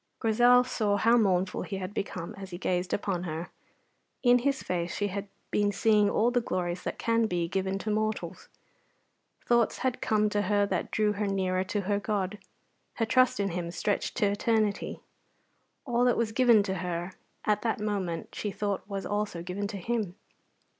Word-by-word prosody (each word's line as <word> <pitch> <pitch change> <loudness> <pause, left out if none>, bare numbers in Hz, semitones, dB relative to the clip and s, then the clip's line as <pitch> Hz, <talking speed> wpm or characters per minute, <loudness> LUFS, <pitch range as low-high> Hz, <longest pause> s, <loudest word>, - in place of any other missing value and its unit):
Grizel 245 +3 +5
saw 215 -5 0
how 230 +3 +4
mournful 190 -5 +2
he 195 - -4
had 190 +1 -5
become 185 -5 -4
as 195 -1 -9
he 175 - -6
gazed 180 0 -1
upon 195 -3 -1
her. 165 +1 -5 0.7
In 245 -1 +6
his 275 +2 0
face 175 -1 -2
she 205 0 -1
had 200 +1 -4 0.2
been 205 -1 +2
seeing 210 -1 +3
all 230 +4 +2
the 245 0 +2
glories 180 -4 -2
that - - -4
can 230 -1 +2
be 175 -3 -1
given 190 +2 -1
to 215 +2 -3
mortals. 215 0 -2 1.0
Thoughts 235 -1 +3
had 255 -1 0
come 215 -1 +2
to 210 0 0
her 205 +1 +2
that - - -2
drew 210 -1 +1
her 205 0 -2
nearer 185 -1 0
to 205 +2 -1
her 200 +1 0
God. 205 -1 -2 0.6
Her 225 - +1
trust 255 0 +3
in 200 -1 +1
him 170 0 -3
stretched 200 +3 -2
to 215 - +3
eternity. 210 0 0 0.8
All 245 -2 +2
that 245 - +3
was 230 -2 0
given 235 -3 +5
to 195 -1 -2
her 175 0 -3 0.3
at 210 -1 +2
that 225 -1 -1
moment 195 -6 -3
she 210 - -3
thought 200 0 -2
was 195 -1 -4
also 205 -5 -2
given 190 +3 -3
to 200 -1 -5
him. 205 -2 -2
205 Hz, 180 wpm, -29 LUFS, 185-220 Hz, 1.0 s, In